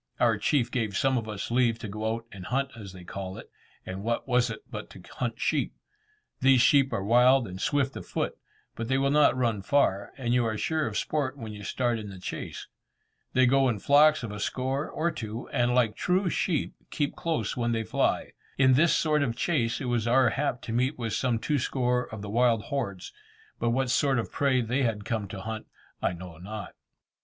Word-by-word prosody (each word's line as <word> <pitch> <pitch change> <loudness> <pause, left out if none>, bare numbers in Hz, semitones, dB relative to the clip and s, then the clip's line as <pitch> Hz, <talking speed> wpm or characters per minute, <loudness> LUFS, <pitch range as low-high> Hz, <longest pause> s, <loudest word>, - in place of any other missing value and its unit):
Our 115 -4 +3
chief 125 +1 +1
gave 110 -6 -1
some 135 -1 +2
of 110 -3 -2
us 105 +1 -5
leave 120 -2 +3
to 115 - -7
go 110 +2 -2
out 115 0 -8
and 95 -2 -9
hunt 135 +3 0
as 105 -4 -9
they 90 -1 -11
call 95 +1 -6
it, - - -11 0.3
and 95 +1 -5
what 115 +5 -2
was 125 -1 +3
it - - -7
but - - -7
to - - -13
hunt - - -2
sheep! - - 0 0.6
These 135 -1 +5
sheep 135 +1 +5
are 95 - -1
wild 125 +3 +5
and 95 0 -7
swift 140 -2 +1
of - - -8
foot, - - -2 0.4
but 115 - -5
they 130 +1 +2
will 135 +1 +2
not 150 -3 +4
run 115 -5 0
far, 100 -4 +1
and 120 -3 -1
you 125 -1 +3
are 110 -1 -1
sure 160 +4 0
of 105 -2 -3
sport 145 +1 -1
when 110 -4 -7
you 105 0 -9
start 120 +2 0
in 105 -1 -7
the 95 - -9
chase. 90 - -6 0.7
They 130 0 +5
go 135 +1 +4
in 115 - 0
flocks 150 +6 +5
of 110 - -4
a 105 - -6
score, 130 +6 -2
or 170 +2 -1
two, 115 -6 -6
and 120 0 +1
like 115 -4 +3
true 180 +3 +1
sheep, 165 -6 0 0.2
keep 145 -3 -1
close 165 -2 -2
when 120 -2 0
they 115 -1 0
fly. - - 0 0.3
In 130 -1 +5
this 155 +6 +4
sort 155 -2 +2
of 120 -5 0
chase 120 -9 0
it 135 - -4
was 120 -2 0
our 125 0 +4
hap 140 -2 -1
to 115 - -4
meet 130 +5 +1
with 115 -3 -3
some 125 0 +1
two 145 +5 0
score 125 -1 0
of 110 -2 -7
the - - -5
wild 115 -1 +3
hordes, 100 -10 -4 0.5
but 120 - +1
what 130 +1 +1
sort 135 +1 +2
of 115 - -2
prey 135 -3 +2
they 125 +4 0
had 110 -5 -1
come 110 -3 -2
to 95 0 -7
hunt 110 +2 -5 0.3
I - - +1
know 85 -2 -10
not. 105 +3 -7
120 Hz, 220 wpm, -28 LUFS, 110-135 Hz, 0.7 s, These